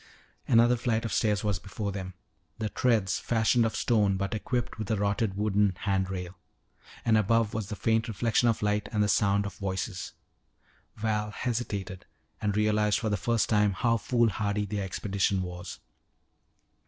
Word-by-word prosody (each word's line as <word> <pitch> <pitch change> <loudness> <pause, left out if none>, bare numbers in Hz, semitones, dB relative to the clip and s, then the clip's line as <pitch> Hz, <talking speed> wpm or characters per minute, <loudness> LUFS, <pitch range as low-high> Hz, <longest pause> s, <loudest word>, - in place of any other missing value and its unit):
Another 120 +1 +5
flight 115 -1 0
of 115 - -3
stairs 105 -3 +1
was 100 -4 0
before 100 +3 -4
them, 95 -2 -6 0.4
the 110 -1 -2
treads 105 -6 +1
fashioned 115 0 +2
of 110 - -5
stone 105 -5 +2
but 100 0 -2
equipped 120 +2 -2
with 110 - -4
a 110 - +2
rotted 100 0 0
wooden 105 -2 +2
hand 95 -2 0
rail. 90 -1 -6 0.7
And 110 -1 +4
above 115 +1 +2
was 110 -3 -3
the 105 - -4
faint 115 +2 +1
reflection 115 +1 +2
of 115 - -1
light 105 0 0
and 105 -2 +2
the - - +1
sound 100 -1 +2
of 100 - -5
voices. 95 0 -3 0.8
Val 105 -1 -1
hesitated 105 -5 -4 0.3
and 105 -1 0
realized 105 -1 +2
for 110 - -2
the 105 - +1
first 115 +4 +1
time 105 -2 +3
how 115 +4 +1
foolhardy 105 -3 0
their 100 0 -3
expedition 95 0 -1
was. 90 0 -7
105 Hz, 165 wpm, -28 LUFS, 100-115 Hz, 0.8 s, Another